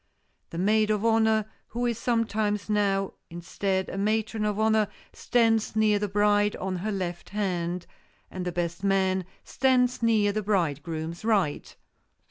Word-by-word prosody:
The 165 - -7
maid 215 +4 +2
of 215 0 0
honor, 220 -1 +3 0.2
who 240 +1 -3
is 235 -2 -1
sometimes 215 -3 0
now, 195 -2 +1 0.2
instead, 190 +3 -2
a 195 - -5
matron 215 +1 0
of 210 0 -1
honor, 220 -1 +3 0.3
stands 225 -3 +1
near 215 -1 +3
the 210 - -1
bride, 205 +1 +2
on 190 -1 -3
her 210 +5 -3
left 180 -3 -4
hand, 180 -4 -2 0.5
and 185 - -5
the 180 - -2
best 170 +1 -3
man 190 -2 +1 0.2
stands 250 -2 +1
near 220 -3 +3
the 215 +1 -2
bridegroom's 165 -4 -2
right. 200 -9 0
205 Hz, 145 wpm, -27 LUFS, 185-220 Hz, 0.5 s, honor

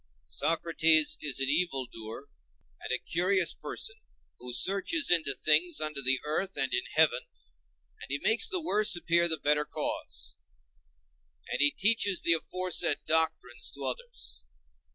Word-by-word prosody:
"Socrates 160 - +1
is 140 -4 -3
an 135 - 0
evil 145 -4 -1
doer, 115 +3 -11 0.5
and - - -7
a - - +1
curious 180 0 0
person, 440 0 -5 0.4
who 125 0 -8
searches 200 - +1
into 160 -6 +2
things 155 +4 +2
under 155 -2 0
the 135 0 +2
earth 185 +5 -1
and 135 -2 +3
in - - -1
heaven, - - +2 0.7
and - - -11
he 140 - -2
makes 220 - +2
the 380 -3 -2
worse 215 - +2
appear 170 0 +1
the 160 - +1
better 150 0 +1
cause; 60 - -6 1.1
and - - -2
he 145 - +5
teaches 200 +2 +1
the 170 - +3
aforesaid 180 -2 +1
doctrines 155 -6 0
to 140 - -9
others." 475 - -6
160 Hz, 145 wpm, -28 LUFS, 140-185 Hz, 1.1 s, he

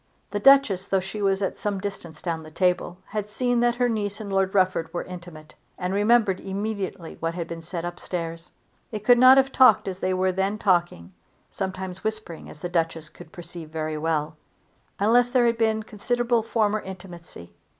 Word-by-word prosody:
The 205 - -1
Duchess, 210 -7 +5
though 195 - +2
she 190 +3 -6
was 195 0 +1
at 195 - -3
some 205 -1 -1
distance 175 -6 -7
down 165 -2 -2
the 155 - -11
table, 180 +1 0
had 210 0 -3
seen 245 +2 0
that 240 0 +2
her 245 0 +2
niece 210 -3 -2
and 205 -2 -6
Lord 195 0 +1
Rufford 185 -4 +2
were 175 - -3
intimate, 175 -4 -11 0.2
and 180 +1 -2
remembered 205 -1 +3
immediately 195 -3 -4
what 165 +1 -2
had 170 -2 -4
been 165 0 -7
said 170 +1 -5
up 175 0 -6
stairs. 165 -1 -5 0.4
They 215 - -4
could 235 +4 +4
not 255 +1 +8
have 270 0 +3
talked 225 -7 +5
as 190 -1 -4
they 185 0 0
were 185 0 +1
then 190 +3 -1
talking, 175 - 0 0.4
sometimes 190 -1 -5
whispering 215 -6 -5
as 150 - -13
the - - -2
Duchess 165 -2 -2
could 155 - -14
perceive 170 -2 -9
very 155 -1 -3
well, 155 -1 -1 0.6
unless 240 +4 +4
there 245 -1 +3
had 235 0 +1
been 220 -1 +1
considerable 235 +3 0
former 215 -1 0
intimacy. 175 - -10
190 Hz, 190 wpm, -25 LUFS, 175-215 Hz, 0.6 s, not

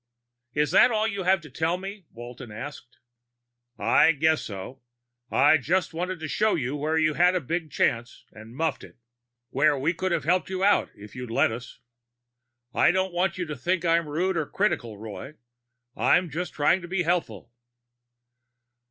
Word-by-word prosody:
"Is 150 0 +1
that 245 +7 +6
all 220 -2 +1
you 200 -3 -3
have 190 0 +3
to 155 - -12
tell 160 +6 0
me?" 195 0 -8
Walton 120 0 -10
asked. 125 +3 -9 0.8
"I 165 - +4
guess 160 +1 +2
so. 105 +6 -8 0.5
I 160 - +5
just 165 +6 0
wanted 180 +2 -3
to 155 - -3
show 215 +7 +1
you 135 -2 -2
where 155 +2 -1
you 155 -1 +2
had 180 +3 +3
a - - +2
big 165 +2 -3
chance 120 -3 -1
and 110 +2 -13
muffed 155 -2 -1
it. - - -14 0.5
Where 145 +2 +3
we 150 +6 0
could 185 +1 -2
have 165 -4 0
helped 180 +6 +1
you 190 0 -2
out 205 +1 +3
if 105 0 -13
you'd 125 -1 -6
let 115 - +2
us. 120 +2 -8 1.0
I - - +4
don't 190 0 0
want 180 +1 0
you 180 - -2
to 150 -2 -5
think 175 +7 -1
I'm 165 0 +3
being 145 - -8
rude 185 +2 0
or 155 -3 -1
critical, 160 - -1
Roy; 110 +7 -8 0.6
I'm 145 +8 +2
just 175 +5 -4
trying 160 +5 +2
to 175 - -8
be 180 0 -1
helpful." 170 -7 -2
160 Hz, 180 wpm, -26 LUFS, 135-180 Hz, 1.0 s, that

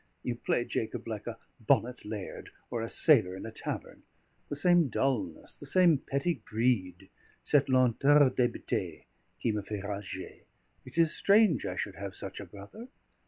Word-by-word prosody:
You 125 - -1
play, 120 0 -1
Jacob, 110 0 -3
like 110 -1 -5
a 115 - -5 0.2
bonnet 120 +2 +1
laird, 105 -2 -6 0.2
or 120 -2 -2
a 115 - -4
sailor 110 - +4
in 95 - -7
a 110 - -6
tavern. - - -6 0.5
The - - -3
same 175 +1 +4
dulness, 125 -10 -2
the - - -9
same 175 -6 +5
petty 140 +4 -2
greed, 110 -5 -1 0.3
cette 145 -2 +2
lenteur 130 +2 +5
d'hébété 125 -1 -2 0.4
qui 115 - 0
me 105 -1 -2
fait 100 0 -6
rager; 100 -2 -6 0.4
it - - -11
is 165 -1 +3
strange 200 - +4
I 90 - -4
should 95 +1 -4
have 100 -2 -6
such 95 -1 -7
a 100 - -7
brother. 100 - -11
120 Hz, 165 wpm, -30 LUFS, 100-145 Hz, 0.5 s, same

